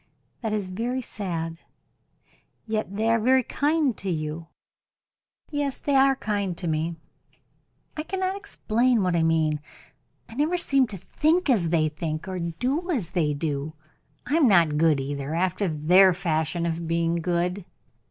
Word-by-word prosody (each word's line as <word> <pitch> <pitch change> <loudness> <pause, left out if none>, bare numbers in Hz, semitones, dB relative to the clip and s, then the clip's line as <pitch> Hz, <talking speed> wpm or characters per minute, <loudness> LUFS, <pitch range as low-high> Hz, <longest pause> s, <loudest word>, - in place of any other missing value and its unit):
"That 220 -3 -2
is 210 -2 -1
very 235 +7 -3
sad. 165 -7 -4 1.1
Yet 215 -3 -3
they 220 +2 0
are 230 0 +3
very 260 +3 +3
kind 295 0 +1
to 195 - -4
you." 155 0 -3 1.0
"Yes, 290 -2 -1
they 285 - -2
are 270 0 +5
kind 200 -7 -2
to 175 - -3
me. 160 +1 -1 1.0
I 305 - -2
cannot 375 +3 -2
explain 250 - 0
what 180 -1 +1
I 170 - +2
mean. 160 -2 +2 0.7
I - - -12
never 300 +8 +1
seem 275 -6 +2
to 205 - -7
think 310 - +1
as 185 -9 +2
they 160 -2 +2
think, 155 +1 -4
or 185 -1 -4
do 250 - -2
as 240 - -1
they 150 -5 0
do. 145 0 -3 0.5
I 295 - +1
am 305 -6 +5
not 165 -7 +4
good 160 -3 +4
either, 140 +2 -4
after 185 +3 0
their 180 +4 +5
fashion 165 0 -1
of 165 0 -3
being 165 0 +1
good." 175 +3 -1
185 Hz, 155 wpm, -25 LUFS, 165-255 Hz, 1.1 s, are